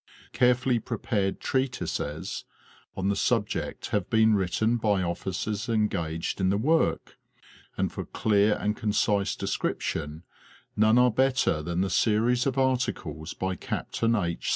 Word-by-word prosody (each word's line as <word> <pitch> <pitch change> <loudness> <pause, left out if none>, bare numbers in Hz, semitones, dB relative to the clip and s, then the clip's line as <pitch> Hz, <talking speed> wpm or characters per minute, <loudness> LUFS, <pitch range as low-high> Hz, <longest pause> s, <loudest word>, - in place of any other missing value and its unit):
Carefully 125 0 +3
prepared 105 -3 -2
treatises 125 - -2 0.5
on 95 +1 0
the 100 - +1
subject - - -1
have 100 -3 -1
been 110 0 +4
written 105 +4 +1
by 105 -4 +1
officers 95 +5 -3
engaged 95 -7 -1
in 95 - +2
the 100 - +2
work, 160 +9 0 0.6
and - - 0
for - - -5
clear 105 -1 +2
and 105 +1 -1
concise 105 -2 +1
descrip - - -2
tion 75 +3 -4 0.5
none 110 +2 +4
are 125 0 +5
better 130 -9 +2
than 85 +3 -2
the 95 - 0
series 115 +6 +2
of 135 0 -1
articles 125 -11 -1
by 95 0 -2
Captain 115 +4 -1
H. 85 -5 -2
105 Hz, 135 wpm, -27 LUFS, 95-120 Hz, 0.6 s, are